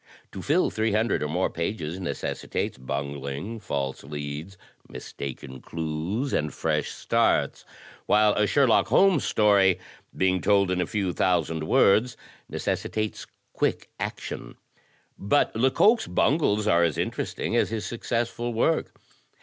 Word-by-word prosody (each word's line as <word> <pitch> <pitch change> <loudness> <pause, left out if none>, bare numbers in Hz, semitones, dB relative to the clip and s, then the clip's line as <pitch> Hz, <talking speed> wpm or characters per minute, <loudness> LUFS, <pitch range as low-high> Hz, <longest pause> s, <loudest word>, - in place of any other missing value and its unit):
To 95 - -7
fill 160 - +2
three 110 -1 0
hundred 110 -3 +1
or 75 - -1
more - - 0
pages 85 0 -3
necessitates 90 - -3
bungling, 70 - -5
false 70 -9 -3
leads, 75 +6 -6 0.3
mistaken 65 -1 -8
clues 85 - -3
and 75 -1 0
fresh - - -1
starts. - - 0 0.4
While 105 0 +4
a 105 0 +2
Sherlock 130 +1 +3
Holmes 190 -7 +4
story, 100 -3 +4 0.4
being 95 -1 +2
told 100 -2 +3
in 90 0 +1
a - - -1
few 100 -5 -1
thousand 80 -4 0
words, 110 +9 +3 0.3
neces - - -1
sitates 110 -1 -3 0.3
quick - - -1
action. - - -5 0.6
But 105 +7 +1
Lecoq's 135 - +3
bungles 120 -8 +2
are 85 -4 +4
as 85 -3 +1
interesting - - -2
as - - +2
his 110 -1 -3
successful 120 0 -2
work. 155 +8 0
95 Hz, 130 wpm, -26 LUFS, 80-115 Hz, 0.6 s, While